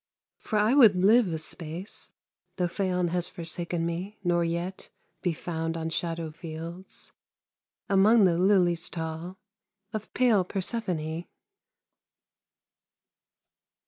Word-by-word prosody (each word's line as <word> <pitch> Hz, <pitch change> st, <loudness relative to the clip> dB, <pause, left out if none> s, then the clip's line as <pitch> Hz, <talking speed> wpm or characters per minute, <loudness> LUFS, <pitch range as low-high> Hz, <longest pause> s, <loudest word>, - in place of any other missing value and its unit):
For 215 Hz, -, -2 dB
I 210 Hz, +4 st, +4 dB
would 235 Hz, -9 st, +7 dB
live 210 Hz, +5 st, +5 dB
a 165 Hz, -2 st, -2 dB
space 165 Hz, +4 st, -6 dB, 0.4 s
Though 180 Hz, -, +1 dB
Phaon 180 Hz, 0 st, 0 dB
has 175 Hz, 0 st, -1 dB
forsaken 170 Hz, 0 st, -3 dB
me, 180 Hz, +5 st, -4 dB
nor 175 Hz, -1 st, +2 dB
yet 170 Hz, +3 st, -3 dB, 0.3 s
Be 180 Hz, -, +1 dB
found 165 Hz, 0 st, -3 dB
on 165 Hz, 0 st, -3 dB
shadow 165 Hz, -1 st, -2 dB
fields 165 Hz, +3 st, -8 dB, 0.8 s
Among 205 Hz, +2 st, +5 dB
the 170 Hz, -2 st, +3 dB
lilies 180 Hz, -3 st, +3 dB
tall 165 Hz, +2 st, -5 dB, 0.6 s
Of 215 Hz, 0 st, -5 dB
pale 235 Hz, -7 st, +4 dB
Persephone. 180 Hz, -5 st, -3 dB
175 Hz, 110 wpm, -28 LUFS, 165-195 Hz, 0.8 s, would